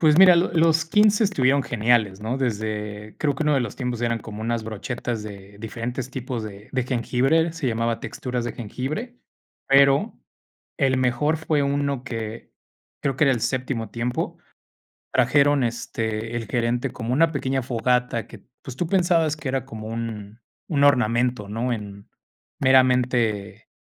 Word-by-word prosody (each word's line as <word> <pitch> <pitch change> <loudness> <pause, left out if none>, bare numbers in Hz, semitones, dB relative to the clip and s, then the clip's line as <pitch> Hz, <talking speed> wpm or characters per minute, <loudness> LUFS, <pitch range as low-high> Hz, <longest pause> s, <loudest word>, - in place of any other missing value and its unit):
Pues 155 0 +5
mira, 185 -2 +9
lo 170 +2 +2
los 160 -1 +3
15 210 +5 +4
estuvieron 140 -9 +2
geniales, 110 -4 +1
¿no? 115 +4 -2
Desde, 105 -3 -3
creo 145 -3 +1
que 155 - -1
uno 150 -1 +3
de 135 - +2
los 115 -4 -4
tiempos 125 -3 -3
eran 115 -1 0
como 110 0 -9
unas 115 0 -2
brochetas 110 +1 -4
de 100 -1 -10
diferentes 120 +4 -5
tipos 125 -3 -4
de 105 -1 -9
de 130 -1 +1
jengibre, 135 +6 +1
se 160 -6 -2
llamaba 115 0 -1
texturas 125 -2 -4
de 120 - -3
jengibre, 140 - -5 0.5
pero 140 +9 +4 0.6
el 135 -4 +2
mejor 130 +5 +1
fue 155 -2 0
uno 140 -2 0
que 115 -2 -6 0.5
creo 135 -2 -1
que 150 - +4
era 135 - +4
el 120 - -1
séptimo 125 -4 -2
tiempo. 120 +1 -3 0.7
Trajeron, 140 +2 +3
este, 115 -1 -3
el 115 -2 -3
gerente 120 +1 0
como 115 +1 -3
una 160 +4 +4
pequeña 135 -2 -1
fogata 125 -1 0
que, - - -13 0.2
pues, 130 - -8
tú 175 - -1
pensabas 170 -4 +2
que 150 - -6
era 135 -1 -1
como 110 -4 -8
un 110 -1 -6 0.3
un 145 -4 +1
ornamento, 125 -5 +2
¿no? 120 +4 -2
En 100 -2 -8 0.5
meramente, 125 -5 +2
125 Hz, 160 wpm, -24 LUFS, 115-140 Hz, 0.7 s, mira